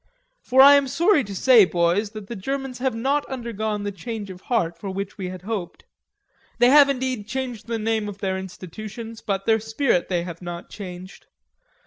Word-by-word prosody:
For 260 +1 +4
I 280 +1 +10
am 280 -1 +1
sorry 320 +3 +3
to 200 -1 -7
say, 240 +1 +6
boys, 180 +3 +1
that 215 -2 -7
the 235 - -7
Germans 270 +4 -4
have 260 -2 0
not 275 +5 +1
undergone 220 -5 -3
the 205 - -2
change 205 +1 -6
of 180 0 -11
heart 185 -9 0
for 195 - -5
which 195 +1 -5
we 185 -1 -3
had 185 -1 -8
hoped. 200 -4 -5 0.7
They 245 +1 +5
have, 285 0 +7
indeed, 255 -5 -2
changed 245 -3 -4
the 230 -1 -2
name 220 -1 -1
of 200 - -8
their 190 -2 -2
institutions, 215 +5 -8
but 195 -1 -2
their 225 0 +3
spirit 220 -3 0
they 175 -2 0
have 170 -1 -8
not 175 -1 -7
changed.... 185 -2 -9
215 Hz, 190 wpm, -23 LUFS, 190-250 Hz, 0.7 s, I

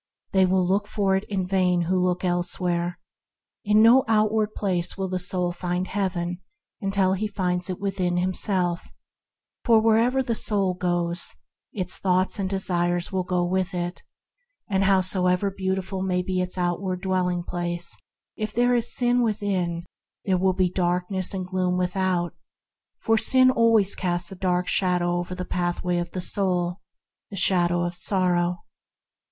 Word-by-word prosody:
They 190 -1 +4
will 185 0 +2
look 200 +3 0
for 195 -2 0
it 195 - -2
in 190 -3 -2
vain 180 -2 +1
who 180 +2 0
look 180 0 0
elsewhere. 175 0 -1 0.7
In 210 +1 +4
no 245 +4 +6
outward 215 -1 +1
place 180 -3 -1
will 190 -1 -2
the 185 0 -2
soul 180 0 0
find 180 +1 -3
Heaven 180 -3 -3 0.4
until 195 -2 +1
it 210 +2 -3
finds 180 -1 0
it 185 - -4
within 185 -3 -1
itself; 180 -1 -1 0.7
for 230 -2 +5
wherever 230 +4 +3
the 240 -2 -1
soul 200 -4 +2
goes 175 -1 -1 0.4
its 185 -3 -2
thoughts 185 +1 +2
and 190 -1 -1
desires 175 -2 -1
go 180 -2 -1
with 185 +1 -1
it; 175 0 -3 0.7
and 195 -2 +1
however 185 0 +2
beautiful 190 0 -3
may 180 -1 0
be 185 0 -1
its 180 +1 -4
outward 180 +1 -2
dwelling 180 -2 0
place, 175 0 -1 0.4
if 215 0 -4
there 245 +1 +2
is 240 -1 0
sin 245 0 +3
within, 190 -6 -1 0.4
there 185 -2 +1
will 190 0 +2
be 185 0 +2
darkness 180 +1 -1
and 185 -2 -2
gloom 180 -1 -1
without; 180 -1 -1 0.6
for 225 0 +1
sin 255 +1 +5 0.4
casts 175 -1 -1
a - - -7
dark 180 -1 0
shadow 180 -2 +1
over 175 +1 -5
the 180 0 -5
pathway 175 0 -1
of 175 0 -4
the 185 - -5
soul 180 -1 0 0.2
— - - -46
the 205 - -8
shadow 175 -1 +3
of 175 0 -2
sorrow. 180 -1 +2
185 Hz, 155 wpm, -24 LUFS, 175-195 Hz, 0.7 s, no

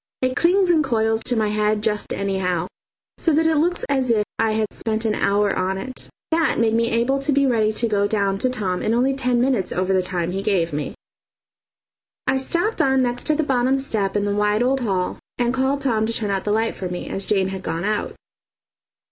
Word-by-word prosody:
It 255 0 +1
clings 360 +3 +3
and 320 -2 +3
coils 225 -3 +1
to 245 - +1
my 215 -2 +1
head 210 0 0
just 210 -1 0
anyhow, 190 -3 -1 0.5
so 325 - +3
that 320 +2 +3
it 320 -1 +3
looks 350 +4 +1
as 265 -3 0
if 215 -3 +2
I 225 -1 +2
had 215 -1 -1
spent 220 0 -2
an 220 - +1
hour 205 0 +1
on 190 +1 -1
it. 255 +6 -6 0.2
That 325 0 +2
made 225 -1 +2
me 230 +1 +2
able 240 +4 +1
to 275 +2 0
be 280 0 +3
ready 225 -4 +2
to 230 +2 0
go 205 -2 +1
down 200 -2 0
to 255 - +2
Tom 195 -7 -2
in 225 - +1
only 260 +3 +2
ten 250 -2 0
minutes 245 -7 +1
over 185 +1 0
the 190 - +3
time 180 -2 -2
he 195 +2 -2
gave 185 -6 0
me. 150 +1 -3 1.3
I 265 - +2
stopped 345 +11 0
on 265 -1 +3
next 245 0 -2
to 305 - +3
the 315 - +1
bottom 265 -1 +1
step 215 -8 -1
in 205 0 +1
the 205 - 0
wide 210 +2 +1
old 265 +2 +1
hall 190 -7 -1 0.2
and 240 0 +1
called 265 +2 0
Tom 225 -5 +1
to 230 - -2
turn 210 -3 -2
out 195 -1 -2
the 210 - 0
light 225 +2 0
for 185 - -5
me, 180 0 -5
as 195 - -4
Jane 195 -2 +1
had 190 -1 -5
gone 165 -1 -3
out. 210 +1 -2
220 Hz, 225 wpm, -22 LUFS, 200-260 Hz, 1.3 s, clings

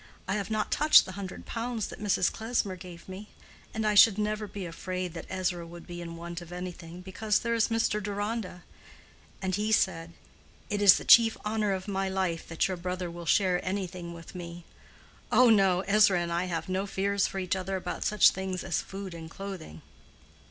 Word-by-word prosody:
I 190 - 0
have 200 -1 -2
not 215 -1 -1
touched 300 +1 +6
the 185 - -7
hundred 190 -1 -7
pounds 230 -1 -3
that - - -10
Mrs. 200 -3 +2
Klesmer 220 -4 -2
gave 175 -2 -11
me; 195 +3 -9 0.4
and 220 0 -3
I 210 - +3
should 205 0 +7
never 210 0 -1
be 200 -2 -6
afraid 180 +1 -4
that 170 - -8
Ezra 180 -2 -2
would 170 0 -11
be 175 0 -7
in 170 -1 -7
want 170 +1 -7
of 175 0 -11
anything, 180 -1 -7
because 205 +3 0
there 235 -1 -1
is 230 -1 +2
Mr. 225 -2 0
Deronda, 205 -2 -4 0.8
and 190 0 -1
he 210 +3 0
said, 170 -5 +1 0.6
'It 205 0 -1
is 200 -2 +8
the - - -7
chief 230 -1 +7
honor 210 -1 0
of 190 0 -3
my 195 -1 -1
life 185 -3 -2
that 165 - 0
your 185 -1 -3
brother 180 0 -4
will 170 0 -9
share 180 +1 +2
anything 185 -2 -4
with 165 -1 -11
me.' 175 -1 -8 0.7
Oh, 250 -2 +6
no! 190 -4 +4
Ezra 200 -2 +4
and 170 -1 -2
I 175 +2 0
can - - -6
have 165 -2 -3
no 190 +2 -1
fears 200 +1 0
for 195 - -7
each 185 0 -1
other 190 +1 -3
about 180 -1 -4
such 210 -2 +5
things 190 -1 -4
as - - -1
food 195 -2 -7
and 165 -1 -8
clothing." 180 - -8
190 Hz, 200 wpm, -29 LUFS, 175-205 Hz, 0.8 s, is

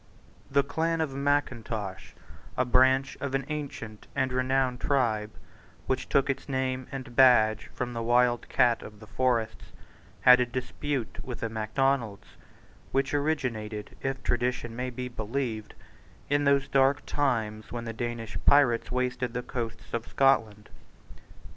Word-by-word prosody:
The 140 0 +3
clan 165 +3 -1
of 155 -4 -1
Mackintosh, 120 -9 -2 0.4
a 125 - +2
branch 130 +2 +3
of 140 -1 -2
an 135 -1 -1
ancient 140 -8 -6
and 130 -2 0
renowned 130 0 +1
tribe 110 -7 +1 0.6
which 130 -1 -2
took 140 0 +3
its 135 +1 -3
name 130 -1 -1
and 130 -3 -7
badge 110 -5 +5
from 125 -1 -3
the 115 - -3
wild 120 0 +2
cat 120 -2 +3
of 105 0 -11
the 110 - -12
forests, 120 -1 -1 0.6
had 125 0 +8
a 125 - +3
dispute 130 +1 -4
with 125 -2 -7
the 115 - -1
Macdonalds, 110 -1 -1 0.6
which 135 +2 0
originated, 125 -8 -2
if 135 -1 -3
tradition 120 -1 -1
may 125 +1 -3
be 125 +1 -5
believed, 115 -1 -4 0.6
in 145 0 +2
those 140 -1 +3
dark 135 +1 +3
times 110 -7 -1
when 120 -1 -4
the 115 - -4
Danish 120 -1 -4
pirates 130 -6 +4
wasted 125 -1 -1
the 125 - -2
coasts 115 -3 -6
of 115 0 -2
Scotland. 115 -6 +2
125 Hz, 140 wpm, -28 LUFS, 115-135 Hz, 0.6 s, had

